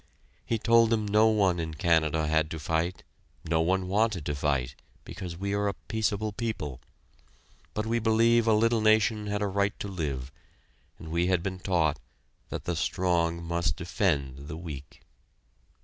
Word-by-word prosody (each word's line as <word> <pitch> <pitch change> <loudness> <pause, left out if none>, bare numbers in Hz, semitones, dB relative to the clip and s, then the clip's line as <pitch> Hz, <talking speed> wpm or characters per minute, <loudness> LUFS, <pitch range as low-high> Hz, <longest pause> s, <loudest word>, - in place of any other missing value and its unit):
He 115 - +1
told 115 +1 +4
them 110 -2 +1
no 105 +2 +5
one 100 -5 +2
in 80 -1 -4
Canada 80 -1 +2
had 80 0 +1
to 80 - -5
fight, 80 +4 -1 0.4
no 80 0 +2
one 95 +2 +1
wanted 100 -4 +1
to 75 - -1
fight, 70 -3 -1 0.3
because 90 -4 -7
we 100 +2 -2
are 100 0 +1 0.2
peaceable 110 -1 0
people, 100 - -4 0.9
but 105 - -1
we 115 +1 0
believe 115 +1 +3
a 110 - +5
little 115 +1 +3
nation 110 0 +3
had 105 0 -1
a - - +1
right 100 +1 0
to - - -4
live, 70 -9 -4 0.7
and 80 - -10
we 85 +1 +1
had 90 -2 +1
been 95 -1 -4
taught 80 -6 +1 0.5
that - - -5
the 85 0 -1
strong 85 -1 0
must 85 -3 -1
defend 70 -7 -1
the 80 - -6
weak. 75 -5 -9
90 Hz, 165 wpm, -28 LUFS, 80-105 Hz, 0.9 s, no